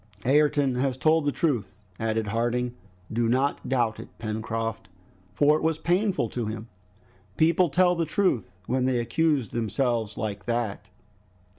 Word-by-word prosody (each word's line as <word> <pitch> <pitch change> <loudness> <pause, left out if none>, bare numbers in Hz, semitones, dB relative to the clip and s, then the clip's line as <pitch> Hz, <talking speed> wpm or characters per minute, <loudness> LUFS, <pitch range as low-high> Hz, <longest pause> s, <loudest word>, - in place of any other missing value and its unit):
"Ayrton 145 0 +3
has 130 0 0
told 155 +3 +3
the 145 - +2
truth," 105 - -2 0.2
added 110 -1 -1
Harding. 120 +2 0 0.4
"Do 115 0 +1
not 135 +4 0
doubt 120 -4 +1
it, - - -8
Pencroft, 115 0 -3 0.4
for 145 +8 +4
it - - -5
was 160 0 +1
painful 180 - +1
to 120 -1 -3
him. 110 +1 -6 0.7
People 165 +2 +4
tell 180 +5 +4
the 170 -1 0
truth 150 - 0
when 130 +3 0
they 130 -2 +1
accuse 135 0 +1
themselves 115 -2 -1
like 105 -4 -4
that!" 115 -4 -2
125 Hz, 145 wpm, -26 LUFS, 115-150 Hz, 0.7 s, for